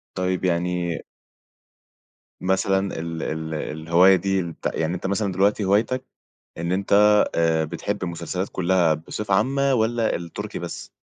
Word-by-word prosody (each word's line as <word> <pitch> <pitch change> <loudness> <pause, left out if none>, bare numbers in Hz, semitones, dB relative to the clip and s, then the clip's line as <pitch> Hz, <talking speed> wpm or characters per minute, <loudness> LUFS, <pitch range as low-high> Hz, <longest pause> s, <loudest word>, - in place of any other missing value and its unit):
طيب 95 0 -1
يعني 85 -1 0 1.4
مثلًا 95 0 0
ال 80 -1 -4
ال 80 0 -4
الهواية 85 +5 +3
دي 95 0 0
البت 85 -2 -6
يعني 80 +3 -1
أنت 90 - -4
مثلًا 100 0 0
دلوقتي 100 +3 +2
هوايتك 115 +6 +1 0.5
إن 85 +1 -2
أنت 95 +2 0 0.4
آآ 80 -1 +2
بتحب 100 +5 -4
المسلسلات 90 +2 -3
كلها 90 -3 +2
بصفة 100 +6 -4
عامة، 135 +6 +2
والّا 115 -1 +1
التركي 85 -1 -6
بس؟ - - -7
90 Hz, 130 wpm, -23 LUFS, 85-100 Hz, 1.4 s, الهواية